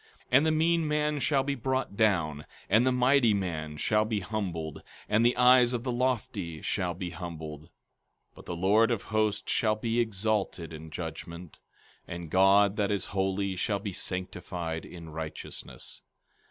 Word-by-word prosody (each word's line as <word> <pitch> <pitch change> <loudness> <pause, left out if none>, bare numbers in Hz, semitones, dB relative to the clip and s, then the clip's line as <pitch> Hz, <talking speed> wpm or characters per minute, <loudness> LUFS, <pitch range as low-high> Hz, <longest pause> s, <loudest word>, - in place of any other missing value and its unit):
15:15 - - -29
And 135 +5 +6
the - - +3
mean 165 +1 +2
man 150 0 0
shall 135 -1 +2
be 140 +1 -1
brought 130 -3 -2
down, 85 -9 +1 0.2
and 115 +4 +5
the - - +4
mighty 125 -3 +4
man 80 -6 -3
shall 105 +6 +2
be 110 -1 -1
humbled, 90 -6 -4 0.3
and 110 +2 +3
the 120 +1 +3
eyes 125 0 +6
of 120 -1 -2
the 125 - -1
lofty 115 -9 -1
shall 90 -3 -1
be 90 -1 -5
humbled. 80 -3 -7
15:16 - - -24 0.6
But - - -14
the 85 - -4
Lord 100 +6 +4
of 115 -5 -1
Hosts 110 -1 0
shall 110 -1 +2
be 115 +2 -1
exalted 100 -6 -1
in 80 0 -9
judgment, 85 +1 -7 0.5
and 85 -2 -7
God 100 +2 +5
that 100 -2 +1
is 100 -3 0
holy 95 0 0
shall 100 +3 0
be 100 -1 -5
sanctified 90 -3 -4
in 85 -2 -10
righteousness. 80 -5 -7
100 Hz, 165 wpm, -29 LUFS, 85-120 Hz, 0.6 s, And